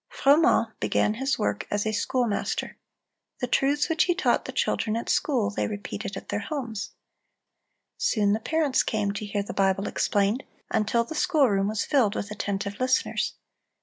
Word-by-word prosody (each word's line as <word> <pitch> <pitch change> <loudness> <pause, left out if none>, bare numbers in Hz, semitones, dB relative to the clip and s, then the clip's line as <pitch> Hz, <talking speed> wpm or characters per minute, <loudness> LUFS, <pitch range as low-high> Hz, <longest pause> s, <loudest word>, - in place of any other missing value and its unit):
(347) 285 +4 +4 0.2
Froment 220 - -27
began 210 - +1
his 270 +1 0
work 100 0 -1
as 205 +1 -1
a 215 - +1
schoolmaster. 220 +1 -1 0.6
The - - 0
truths 280 +4 +2
which 325 -2 +2
he 350 - +1
taught - - +1
the - - -5
children 220 -2 0
at 230 - -3
school, 235 -8 +1
they - - -1
repeated 205 0 -5
at - - -10
their - - -1
homes. 235 -6 -5 1.1
Soon 205 -3 +2
the 215 - 0
parents 305 +2 +1
came 210 -2 -1
to 205 +1 -5
hear 200 0 -1
the - - -7
Bible 195 0 +1
explained, 205 +5 +1 0.3
until 220 +1 +2
the 235 - -7
schoolroom 255 - +2
was 215 +1 -1
filled 245 -9 +2
with 205 - -4
attentive 200 -1 -3
listeners. 255 0 0
220 Hz, 170 wpm, -26 LUFS, 205-265 Hz, 1.1 s, 347